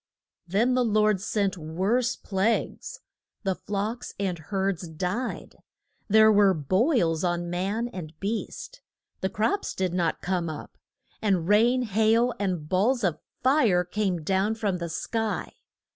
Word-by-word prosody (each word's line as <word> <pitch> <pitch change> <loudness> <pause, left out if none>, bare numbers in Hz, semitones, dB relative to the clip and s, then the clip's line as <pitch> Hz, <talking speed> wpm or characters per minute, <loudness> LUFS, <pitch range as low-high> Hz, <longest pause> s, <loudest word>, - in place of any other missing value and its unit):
Then 220 +8 +2
the 250 0 +3
Lord 215 -3 +2
sent 200 -3 -1
worse 195 +11 0
plagues: 200 +3 -2 0.4
the 190 -2 +1
flocks 210 +5 -4
and 185 -4 -1
herds 190 +1 -2
died; 180 +10 -4 0.5
there 220 0 +6
were 200 -2 +5
boils 170 - +1
on 175 -1 -1
man 200 +6 -1
and 160 -7 -9
beast; 230 - -4 0.4
the 190 - -1
crops 375 - -1
did 185 -2 -1
not 175 -2 0
come 180 -2 -1
up, 155 - -8 0.5
and 190 -6 +1
rain, 235 +5 +4
hail, 225 +3 +2
and 180 -6 -2
balls 220 +8 +2
of 175 -5 0 0.2
fire 245 -10 +4
came 180 -2 -2
down 195 +6 +1
from 200 -5 -1
the 170 -1 -4
sky. 225 +6 -2
195 Hz, 135 wpm, -26 LUFS, 180-225 Hz, 0.5 s, there